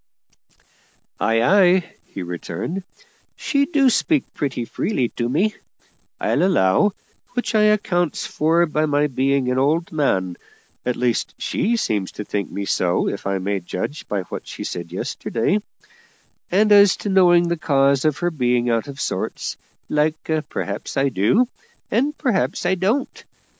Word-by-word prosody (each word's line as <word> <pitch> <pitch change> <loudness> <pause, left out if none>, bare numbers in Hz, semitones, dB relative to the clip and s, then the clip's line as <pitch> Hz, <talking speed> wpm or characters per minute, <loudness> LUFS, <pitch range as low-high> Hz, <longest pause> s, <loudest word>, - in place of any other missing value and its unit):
"Ay, 115 0 +2
ay," 185 +2 +4
he 95 - -7
returned; 90 - -5 0.5
"she 280 -1 0
do 285 -5 +3
speak 280 +4 +2
pretty 130 -4 -2
free 130 - -1
to 120 -1 -3
me, 200 - +1 0.7
I'll - - +1
allow; 180 - +3 0.4
which 245 - -1
I 215 -1 +4
accounts 190 -6 +1
for 165 +3 +2
by 155 -1 0
my 145 0 +2
being 135 -1 +1
an 130 - +1
old 155 +5 +1
man 95 - 0 0.5
at 125 - +1
least, 120 -2 -1
she 235 +3 0
seems 105 - -1
to 105 - -6
think 100 0 -3
me 100 - -4
so, 90 -2 +1
if 100 - -4
I 100 0 0
may 100 +1 -2
judge 90 - -5
by 100 -2 -2
what - - -8
she - - -7
said 85 -1 -5
yesterday; 115 - -1 0.9
and 210 +4 +3
as 200 -2 +7
to 205 - -4
knowing 175 -2 +5
the 170 - 0
cause 140 -4 +2
of 155 -2 +1
her 175 0 -1
being 125 -4 +1
out 115 +4 0
of 140 0 -9
sorts - - -3 0.3
like, 155 +1 0 0.2
perhaps - - -4
I 135 0 +3
do, 130 - +2 0.4
and 280 +7 +1
perhaps 190 - 0
I 180 - +3
don't. 205 +9 -1
150 Hz, 155 wpm, -21 LUFS, 120-190 Hz, 0.9 s, as